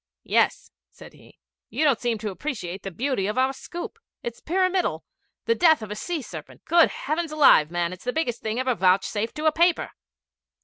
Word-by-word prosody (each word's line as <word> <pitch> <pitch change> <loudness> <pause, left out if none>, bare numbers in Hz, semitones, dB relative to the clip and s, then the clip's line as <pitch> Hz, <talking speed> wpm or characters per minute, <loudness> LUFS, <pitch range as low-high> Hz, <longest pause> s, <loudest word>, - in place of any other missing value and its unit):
'Yes,' - - +1 0.2
said - - -14
he. - - -19 0.3
'You 310 - 0
don't 275 -6 +3
seem 240 -2 -1
to 210 -1 -4
appreciate 195 - -5
the 195 - -5
beauty 225 +1 -1
of 210 - -3
our 260 +1 +2
scoop. 345 +10 -8 0.2
It's 235 -1 -6
pyramidal 370 +1 0 0.4
the 460 - +3
death 320 - +4
of 215 - -7
the 210 - -4
sea 320 +6 -4
serpent! - - -10
Good 340 -1 +5
heavens 315 +2 -3
alive, 280 - +6
man, 175 0 -1
it's 185 - -12
the 250 - 0
biggest 250 -6 -2
thing 220 +2 -2
ever 255 0 +1
vouchsafed 200 +3 +1
to 305 - -4
a 315 - +5
paper!' 340 +2 +2
255 Hz, 190 wpm, -25 LUFS, 210-320 Hz, 0.4 s, alive